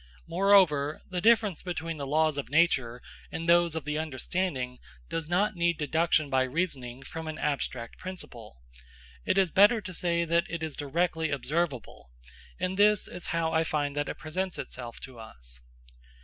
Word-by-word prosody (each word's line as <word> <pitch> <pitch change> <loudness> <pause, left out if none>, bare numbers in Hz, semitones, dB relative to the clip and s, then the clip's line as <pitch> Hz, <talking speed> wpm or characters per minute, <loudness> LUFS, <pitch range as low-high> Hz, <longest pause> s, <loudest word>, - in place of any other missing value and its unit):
Moreover, 165 -5 +4
the 180 -1 -1
difference 215 -4 +4
between 165 -3 -4
the 140 -2 -4
laws 155 0 +2
of 135 - -5
nature 130 -6 +2 0.3
and 165 +1 -4
those 170 -1 +4
of 160 -3 -4
the 150 +1 -1
understanding 140 -3 -2 0.3
does 165 -2 -3
not 185 +5 +1
need 170 -1 +1
deduction 160 0 +2
by 130 -1 +2
reasoning 130 -3 -2
from 160 +2 -7
an 155 - -4
abstract 130 -5 -3
principle; 120 - -9 0.6
it - - +1
is 190 -4 +3
better 205 +4 +6
to 185 -2 -7
say 170 0 0
that 170 +2 +1
it 170 -1 -4
is 155 -3 -4
directly 160 +2 0
observable, 140 - -2 0.5
and 185 +1 -1
this 210 0 +4
is 180 - -8
how 165 -1 0
I 160 0 +3
find 145 -3 -1
that 145 0 -1
it - - -5
presents 180 +4 -3
itself 120 -2 -7
to 130 -3 -10
us. 60 - -6
160 Hz, 165 wpm, -29 LUFS, 140-175 Hz, 0.6 s, better